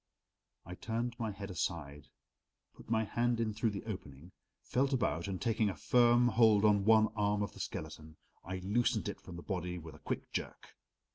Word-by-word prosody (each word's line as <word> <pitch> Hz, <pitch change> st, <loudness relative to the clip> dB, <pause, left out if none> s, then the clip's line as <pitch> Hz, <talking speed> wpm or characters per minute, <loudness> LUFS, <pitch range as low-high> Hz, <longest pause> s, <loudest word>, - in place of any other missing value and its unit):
I 90 Hz, -, -7 dB
turned 115 Hz, +5 st, -3 dB
my 115 Hz, -2 st, -1 dB
head 100 Hz, -1 st, -6 dB
aside, 75 Hz, -5 st, -4 dB, 0.7 s
put -, -, -16 dB
my 110 Hz, -1 st, +2 dB
hand 120 Hz, +2 st, 0 dB
in 110 Hz, -2 st, 0 dB
through 110 Hz, +2 st, 0 dB
the 100 Hz, -1 st, -5 dB
opening, 85 Hz, -6 st, -8 dB, 0.3 s
felt 135 Hz, +2 st, +1 dB
about, 85 Hz, -, 0 dB
and 95 Hz, -2 st, -3 dB
taking 110 Hz, -2 st, +1 dB
a 95 Hz, -, -4 dB
firm 120 Hz, +7 st, +4 dB
hold 110 Hz, -2 st, +5 dB
on 100 Hz, -2 st, +4 dB
one 110 Hz, -1 st, +6 dB
arm 105 Hz, -1 st, +1 dB
of 100 Hz, -, -5 dB
the -, -, -13 dB
skeleton, 80 Hz, 0 st, -6 dB, 0.3 s
I 95 Hz, +2 st, -4 dB
loosened 110 Hz, +5 st, +1 dB
it -, -, -7 dB
from 90 Hz, -, -10 dB
the 85 Hz, -, -8 dB
body 90 Hz, -2 st, -3 dB
with 80 Hz, -2 st, -9 dB
a -, -, -14 dB
quick -, -, -4 dB
jerk. -, -, -5 dB
105 Hz, 190 wpm, -33 LUFS, 90-115 Hz, 0.7 s, one